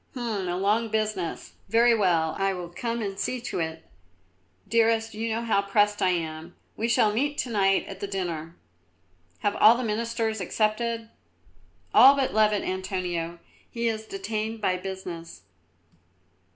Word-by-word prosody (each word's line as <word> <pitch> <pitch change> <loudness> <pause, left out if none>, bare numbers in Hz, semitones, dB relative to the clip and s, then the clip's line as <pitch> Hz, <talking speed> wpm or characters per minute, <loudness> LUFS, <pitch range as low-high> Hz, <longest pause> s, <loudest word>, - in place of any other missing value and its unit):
"H'm, 225 -7 -3
a 175 - -1
long 210 +4 +1
business! 215 -6 -2 0.2
Very 235 +2 +5
well, 170 -7 +2
I 195 0 +1
will 175 -1 -6
come 230 +5 -3
and 195 -1 -4
see 255 - -1
to 240 - -4
it. 160 0 -4 0.8
Dearest, 225 0 +2
you 225 +2 -3
know 225 +1 -1
how 220 -4 +2
pressed 205 +1 +1
I 185 - +4
am. 165 -1 -3 0.2
We 225 - -1
shall 220 -2 +3
meet 290 +6 0
to 245 - -2
night 195 -2 +2
at - - -9
the 200 - -3
dinner. 170 -4 -4 0.9
Have 205 - 0
all 225 +3 +7
the 255 - -2
Ministers 225 -1 -1
accepted?" 225 +4 -1 0.8
"All 275 +2 +9
but 270 -2 0
Louvet, 210 -1 +3
Antonio. 180 -3 -3 0.3
He 235 0 -2
is 220 -1 -2
detained 225 - -4
by 185 -3 +1
business." 180 -3 -7
210 Hz, 150 wpm, -26 LUFS, 185-230 Hz, 0.9 s, All